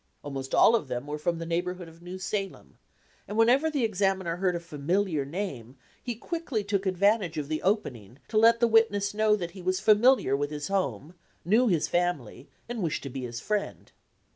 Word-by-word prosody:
Almost 135 Hz, -2 st, -4 dB
all 225 Hz, -, +6 dB
of 215 Hz, -, -1 dB
them 125 Hz, +1 st, -4 dB
were 150 Hz, +1 st, -5 dB
from 170 Hz, +2 st, -1 dB
the 165 Hz, -, -5 dB
neighborhood 175 Hz, +1 st, -3 dB
of 165 Hz, +1 st, -16 dB
New 180 Hz, +2 st, -7 dB
Salem, 195 Hz, +1 st, -5 dB, 0.5 s
and 205 Hz, -, -5 dB
whenever 250 Hz, +7 st, +4 dB
the 290 Hz, -5 st, -1 dB
examiner 190 Hz, -5 st, 0 dB
heard 180 Hz, -1 st, 0 dB
a -, -, -2 dB
familiar 170 Hz, 0 st, -1 dB
name 140 Hz, -, -5 dB, 0.2 s
he 240 Hz, -2 st, -4 dB
quickly 280 Hz, -4 st, -3 dB
took 200 Hz, -1 st, -1 dB
advantage 190 Hz, -1 st, +2 dB
of 145 Hz, -2 st, -3 dB
the 155 Hz, 0 st, -2 dB
opening 130 Hz, -, -2 dB
to 215 Hz, -, -1 dB
let 230 Hz, +1 st, +5 dB
the 235 Hz, -, +4 dB
witness 205 Hz, -3 st, +3 dB
know 215 Hz, 0 st, +3 dB
that 175 Hz, -4 st, -5 dB
he 190 Hz, -, -11 dB
was 185 Hz, +1 st, 0 dB
familiar 215 Hz, -, +4 dB
with 145 Hz, +1 st, -1 dB
his 150 Hz, +1 st, -5 dB
home, 160 Hz, -, -2 dB, 0.3 s
knew 225 Hz, +8 st, +4 dB
his 170 Hz, -7 st, +1 dB
family, 175 Hz, -8 st, -2 dB, 0.2 s
and 235 Hz, -2 st, -4 dB
wished 165 Hz, -4 st, -2 dB
to 140 Hz, -, -6 dB
be 135 Hz, -, -5 dB
his 120 Hz, -1 st, -6 dB
friend. 210 Hz, +5 st, -3 dB
185 Hz, 195 wpm, -27 LUFS, 150-210 Hz, 0.5 s, all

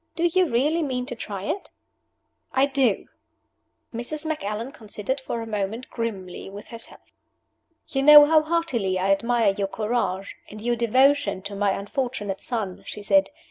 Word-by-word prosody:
Do 335 Hz, -, -2 dB
you 355 Hz, 0 st, +3 dB
really 290 Hz, +8 st, +2 dB
mean 255 Hz, -4 st, -2 dB
to 245 Hz, -, -5 dB
try 200 Hz, -4 st, -6 dB
it?" 375 Hz, -, -3 dB, 0.8 s
"I 265 Hz, +1 st, +4 dB
do!" 270 Hz, -6 st, +1 dB, 0.9 s
Mrs. 270 Hz, +7 st, -4 dB
Macallan 230 Hz, -5 st, -3 dB
considered 225 Hz, +3 st, -4 dB
for 235 Hz, -3 st, -4 dB
a -, -, -6 dB
moment 215 Hz, +2 st, -3 dB
grimly 195 Hz, -7 st, -5 dB
with 200 Hz, +1 st, -10 dB
herself. 230 Hz, -1 st, -9 dB, 0.9 s
"You 270 Hz, -, -1 dB
know 295 Hz, +1 st, +10 dB
how 310 Hz, +1 st, +5 dB
heartily 285 Hz, -, 0 dB
I 190 Hz, +2 st, +1 dB
admire 230 Hz, 0 st, +2 dB
your 195 Hz, 0 st, -2 dB
courage, 200 Hz, -3 st, -2 dB
and 215 Hz, -, -9 dB
your 240 Hz, +2 st, 0 dB
devotion 240 Hz, -3 st, +3 dB
to 200 Hz, 0 st, -6 dB
my 200 Hz, -1 st, +1 dB
unfortunate 205 Hz, -2 st, -3 dB
son," 215 Hz, -7 st, -4 dB
she 210 Hz, -, -7 dB
said. 290 Hz, +7 st, +3 dB
235 Hz, 155 wpm, -24 LUFS, 205-275 Hz, 0.9 s, know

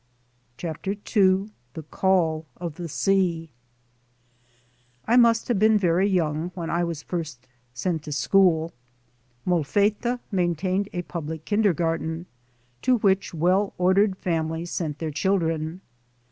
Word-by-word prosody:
CHAPTER 175 Hz, +3 st, -4 dB
H 205 Hz, -, -13 dB, 0.6 s
THE 160 Hz, -, -6 dB
CALL 165 Hz, -5 st, +1 dB
OF 170 Hz, -3 st, -5 dB
THE 170 Hz, +1 st, -7 dB
SEA 170 Hz, -2 st, 0 dB, 1.6 s
IMUST 230 Hz, -1 st, +4 dB
have 230 Hz, -5 st, +2 dB
been 215 Hz, +1 st, +5 dB
very 185 Hz, 0 st, +2 dB
young 165 Hz, -3 st, 0 dB
when 170 Hz, -3 st, -4 dB
I 170 Hz, +1 st, +1 dB
was 170 Hz, -3 st, -4 dB
first 155 Hz, -8 st, -5 dB, 0.3 s
sent 165 Hz, +4 st, -1 dB
to 150 Hz, -, -6 dB
school. 160 Hz, +4 st, +3 dB, 0.7 s
Molfetta 205 Hz, -, +1 dB
maintained 185 Hz, +2 st, 0 dB
a 175 Hz, -1 st, -3 dB
public 160 Hz, -2 st, -6 dB
kindergarten, 170 Hz, -5 st, 0 dB, 0.6 s
to 255 Hz, -1 st, +3 dB
which 195 Hz, -4 st, +1 dB
well 185 Hz, +5 st, +1 dB
ordered 190 Hz, +2 st, +3 dB
families 165 Hz, -1 st, -2 dB
pent 155 Hz, -4 st, -3 dB
their 160 Hz, 0 st, -4 dB
children. 165 Hz, -1 st, -1 dB
175 Hz, 120 wpm, -25 LUFS, 160-195 Hz, 1.6 s, been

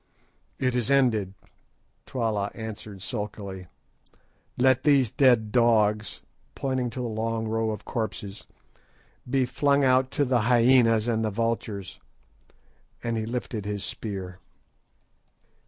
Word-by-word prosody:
"It 130 Hz, -1 st, 0 dB
is 120 Hz, -3 st, 0 dB
ended," 110 Hz, -8 st, +2 dB, 0.7 s
Twala 110 Hz, -5 st, -1 dB
answered 110 Hz, -3 st, -8 dB
sulkily. 100 Hz, -4 st, -5 dB, 0.9 s
"Let 130 Hz, 0 st, +4 dB
these 140 Hz, -6 st, +3 dB
dead 120 Hz, -5 st, +3 dB
dogs," 110 Hz, -3 st, +2 dB, 0.3 s
pointing 130 Hz, -3 st, -1 dB
to 125 Hz, +2 st, -6 dB
the 120 Hz, -, -2 dB
long 110 Hz, 0 st, -2 dB
rows 110 Hz, 0 st, 0 dB
of 105 Hz, -, -9 dB
corpses, 105 Hz, -3 st, -5 dB, 0.8 s
"be 130 Hz, 0 st, +2 dB
flung 140 Hz, +3 st, +2 dB
out 130 Hz, 0 st, +3 dB
to 145 Hz, -, +2 dB
the 125 Hz, -1 st, +2 dB
hyænas 120 Hz, -1 st, +4 dB
and 110 Hz, -2 st, +1 dB
the 110 Hz, -, +1 dB
vultures," 110 Hz, -3 st, -3 dB, 1.0 s
and 115 Hz, -1 st, -1 dB
he 110 Hz, -1 st, -2 dB
lifted 115 Hz, -3 st, -4 dB
his 105 Hz, -1 st, -3 dB
spear. 95 Hz, -4 st, -6 dB
115 Hz, 120 wpm, -26 LUFS, 105-125 Hz, 1.0 s, Let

